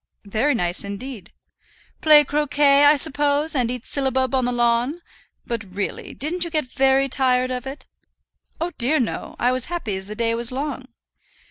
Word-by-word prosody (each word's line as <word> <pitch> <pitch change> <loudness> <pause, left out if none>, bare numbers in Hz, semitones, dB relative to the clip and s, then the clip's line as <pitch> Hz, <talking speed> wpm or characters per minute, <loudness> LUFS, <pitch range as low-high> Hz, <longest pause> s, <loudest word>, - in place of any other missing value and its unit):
"Very 225 +8 0
nice 175 -5 +1
indeed." 200 +1 -8 0.7
"Play 300 -1 +7
croquet, 290 -1 +3
I 295 +1 +7
suppose, 290 +2 +2
and 250 -5 0
eat 250 -1 -5
syllabub 265 -2 -1
on 260 -2 +1
the 245 - 0
lawn? 240 +7 0 0.4
But, 205 -6 -6
really, 200 -1 -4
didn't 340 +6 0
you 340 - -4
get 310 -3 -1
very 270 +1 +2
tired 255 -1 +1
of 250 +1 -4
it?" 275 +2 -8 0.7
"Oh 340 +2 -2
dear, 265 +6 +2
no. 240 - -4
I 245 - +1
was 255 -1 +2
happy 330 - -4
as 190 0 -6
the 210 - -7
day 230 0 0
was 235 +1 0
long." 270 -1 -4
260 Hz, 170 wpm, -22 LUFS, 235-290 Hz, 0.7 s, Play